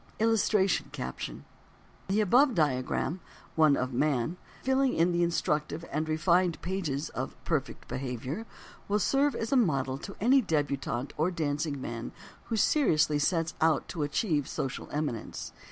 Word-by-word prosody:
A 220 - +3
Word 225 - +4
of 220 - +1
Warning 200 -3 +4
and 190 - 0
Encouragement 60 -1 -5 0.6
The 200 +3 +2
above 245 +6 +4
diagram 150 +3 0 0.4
(one 155 -3 +5
of 125 0 -2
man), 140 +3 +1 0.3
filling 265 0 +2 0.2
the 175 0 +1
instructive 165 -1 0
and 155 +1 -1
refined 170 +2 +2
pages 165 -6 -2
of - - -5
PERFECT - - -2
BEHAVIOR, 130 - -4 0.4
_will 205 +1 +2
serve 275 +6 +2
as 225 - -3
a - - +4
model 135 - +1
to 200 - -8
any 260 +6 +5
debutante 140 - -1
or 160 +4 +2
dancing 150 -3 -2
man 120 -3 -5 0.3
who 225 - -2
seriously 155 - +3
sets 165 +1 +1
out 160 -1 +3
to 165 - -4
achieve 145 - 0
social 135 -1 -4
eminence. 145 -7 -4
160 Hz, 155 wpm, -29 LUFS, 140-200 Hz, 0.6 s, one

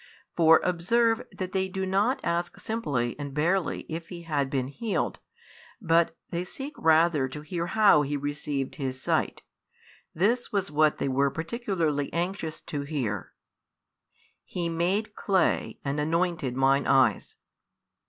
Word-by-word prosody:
For 160 -1 +6
observe 225 +7 +2
that 185 -1 -5
they 190 -1 0
do 190 +1 -3
not 200 +8 +1
ask 170 +1 -2
simply 140 - -2
and 140 -1 -6
barely 170 +4 +1
if 165 +1 -6
he 175 -2 -8
had 145 -4 -1
been 130 -2 -1
healed, 215 - -2 0.6
but 165 -4 +2
they 175 0 -1
seek 270 +11 -6
rather 160 -3 +4
to 150 +3 -8
hear 170 +3 -3
how 210 -7 +5
he 145 0 -1
received 145 -1 -3
his 130 -3 -3
sight; - - -1 0.7
this 230 +10 +1
was 195 -5 -1
what 155 0 +3
they - - -1
were 140 +1 +2
particularly 165 - -2
anxious 170 -2 -2
to 145 -4 -4
hear: 130 - -3 1.1
"He 170 -2 -3
made 185 +6 0
clay, 190 -4 +1
and 140 +1 -1
anointed 165 -4 0
mine 135 +1 +3
eyes." 130 -7 +3
165 Hz, 140 wpm, -27 LUFS, 145-190 Hz, 1.1 s, For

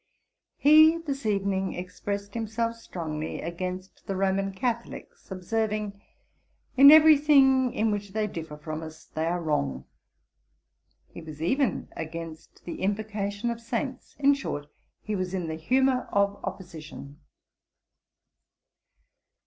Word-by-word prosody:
He 310 +2 +7
this 280 -7 -4
evening 195 -2 0
expressed 200 +3 -5
himself 230 0 -2
strongly 160 -8 -5
against 185 +2 -6
the 195 - -2
Roman 195 +1 0
Catholics; 235 +3 -5
observing, 210 +1 -2 0.7
'In 275 +2 +9
every 315 +1 +9
thing 265 -4 +5
in 220 0 0
which 205 -1 -3
they 215 0 0
differ 160 -6 -7
from 155 +1 -6
us 160 0 -10
they 160 +1 -3
are 175 +1 0
wrong.' 70 - -1 1.3
He - - -8
was 155 -2 -10
even 250 - 0
against 165 0 -8
the 175 - -6
invocation 205 +2 -2
of 235 0 -6
saints; 250 +3 -4
in 285 0 +4
short, 145 - -4 0.4
he 215 - -3
was 185 -1 -3
in 180 -3 -3
the 160 - -3
humour 255 +9 +1
of 200 0 +1
opposition. 160 -6 -8
200 Hz, 125 wpm, -27 LUFS, 170-235 Hz, 1.3 s, In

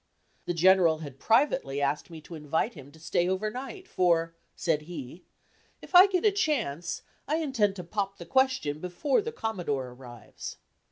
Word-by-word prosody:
The 175 - -2
General 175 -2 +5
had 135 -1 -10
privately 230 - +2
asked 145 +3 -1
me 165 -2 -9
to 170 - -12
invite 160 - -1
him 140 -3 -12
to 160 - -17
stay 175 +2 0
over 200 +3 -1
night, 275 - -7
for, 165 - +2 0.2
said 160 -3 0
he, 160 +1 -8 0.5
"If - - -14
I 365 +2 +10
get 375 0 0
a 425 - +6
chance, 260 - -1 0.2
I 300 - +1
intend 265 -11 +1
to 180 - -6
'pop 195 +2 -3
the 170 - -9
question' 260 - +1
before 180 - 0
the 460 +3 -4
Commodore 175 - -3
arrives." 125 -2 -10
180 Hz, 170 wpm, -28 LUFS, -, 0.5 s, I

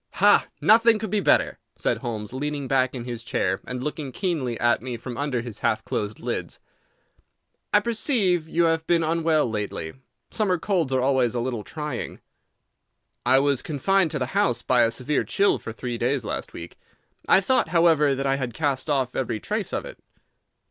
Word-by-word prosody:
"Ha! - - +5
Nothing 230 +1 +5
could 215 -2 -5
be 210 - +2
better," - - +2 0.2
said - - -1
Holmes, 110 -1 -5
leaning 145 +1 -3
back 130 0 +1
in 120 - -5
his 120 -2 -6
chair 95 -4 -1
and 125 0 -4
looking 150 -2 -4
keenly 140 - -2
at 120 0 +2
me 125 -1 -5
from 120 +1 -7
under 140 -2 -1
his 120 -3 -8
half - - 0
closed 105 0 -3
lids. - - -4 1.1
"I 210 - +5
perceive 215 - +1
that 160 - -18
you 170 - +2
have 165 -1 +1
been 170 -1 +3
unwell 160 -2 +2
lately. 105 -7 -4 0.4
Summer 195 -4 +1
colds 170 -5 0
are 130 -1 +2
always 130 -3 +2
a - - 0
little 120 -3 -3
trying." 150 -2 -5 1.1
"I 130 +1 +6
was 140 -1 +2
confined 175 +5 +1
to 155 - -3
the 130 - -1
house 125 - +1
by 125 -1 +3
a 115 - +4
severe 130 +5 -1
chill 200 +1 +2
for - - -7
three 120 +1 -5
days 125 0 0
last - - -4
week. - - -10 0.5
I - - +7
thought, 225 +7 +2
however, 160 -5 +4
that 135 +1 -3
I 135 0 +2
had 125 -4 -4
cast 145 -1 -1
off 130 -3 0
every 120 -4 -2
trace - - -3
of - - -3
it." - - -10
135 Hz, 190 wpm, -24 LUFS, 120-165 Hz, 1.1 s, I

